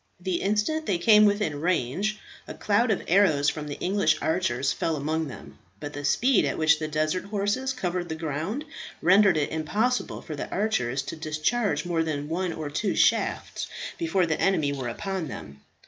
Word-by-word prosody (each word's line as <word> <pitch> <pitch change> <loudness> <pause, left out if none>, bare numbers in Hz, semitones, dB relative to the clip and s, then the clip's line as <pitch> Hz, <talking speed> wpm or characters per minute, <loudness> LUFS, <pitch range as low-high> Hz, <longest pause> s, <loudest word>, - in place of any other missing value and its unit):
The 180 -1 -2
instant 215 +11 0
they 190 - +1
came 210 +4 +6
within 205 -8 0
range, 185 - 0 0.3
a - - -7
cloud 215 +4 +1
of 205 - 0
arrows 160 -6 +4
from 150 -1 -5
the 145 - -5
English 200 +2 +2
archers 140 -6 0
fell 165 - -1
among 155 +2 -1
them, 130 - -11 0.2
but 145 +4 -6
the 145 - -6
speed 240 - +3
at - - -1
which 155 -1 +4
the 155 - -2
desert 155 +4 -1
horses 205 +6 -1
covered 180 -8 -3
the 160 - -3
ground 165 - -3 0.4
rendered 190 0 +5
it 145 - 0
impossible 210 +11 -1
for 155 - -6
the - - -5
archers 140 - -1
to - - -6
discharge 155 +3 -1
more 170 -2 0
than 150 -2 -3
one 180 +2 -1
or 155 -2 -5
two 200 +7 -1
shafts - - +1 0.3
before 195 - +1
the 160 -2 -1
enemy 155 -7 +2
were 130 -3 -4
upon 190 +7 -4
them. 70 - -9
170 Hz, 180 wpm, -26 LUFS, 150-205 Hz, 0.4 s, came